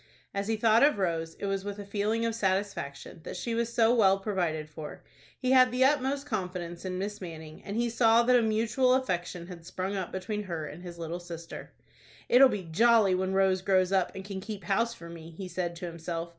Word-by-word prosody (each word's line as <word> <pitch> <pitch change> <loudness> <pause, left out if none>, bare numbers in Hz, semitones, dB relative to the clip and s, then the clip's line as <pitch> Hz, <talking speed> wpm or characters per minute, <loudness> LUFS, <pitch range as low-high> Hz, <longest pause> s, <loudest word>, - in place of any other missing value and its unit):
As 200 0 -2
he 225 - +1
thought 225 +1 +4
of 290 -4 +5
Rose, 165 -4 -1
it - - -6
was 195 -1 -1
with 205 0 -5
a 205 - -7
feeling 215 +3 -1
of 230 - 0
satisfaction 190 -8 -2
that - - -7
she 230 +6 -3
was 235 0 -1
so 230 0 +4
well 195 -5 +5
provided 175 -6 -2
for. 155 0 -9 0.3
He 255 -1 -1
had 255 -2 +6
the 255 +1 +3
utmost 275 0 +1
confidence 180 -8 -4
in 185 -1 -3
Miss 205 +2 -4
Manning, 160 -3 -9
and 205 +2 -4
he 240 0 +1
saw 230 0 +4
that 250 +1 +4
a 245 - +5
mutual 230 +4 +2
affection 180 -8 -2
had 175 -2 -10
sprung 185 +3 -4
up 190 -3 -3
between 210 +3 -3
her 165 -4 -4
and 150 +3 -9
his 175 -1 -9
little 170 +1 -4
sister. 170 -1 -9 0.6
"It'll 260 +2 +8
be 205 -5 -3
jolly 215 +4 +4
when 185 +1 0
Rose 190 -1 +3
grows 185 -1 +2
up, 190 -2 +2
and 190 0 -7
can 195 -1 -5
keep 205 -2 -7
house 230 +6 0
for 170 - -11
me," 165 -1 -10
he 190 - -5
said 175 -1 -3
to 175 - -6
himself. 170 0 -5
195 Hz, 220 wpm, -29 LUFS, 175-225 Hz, 0.6 s, It'll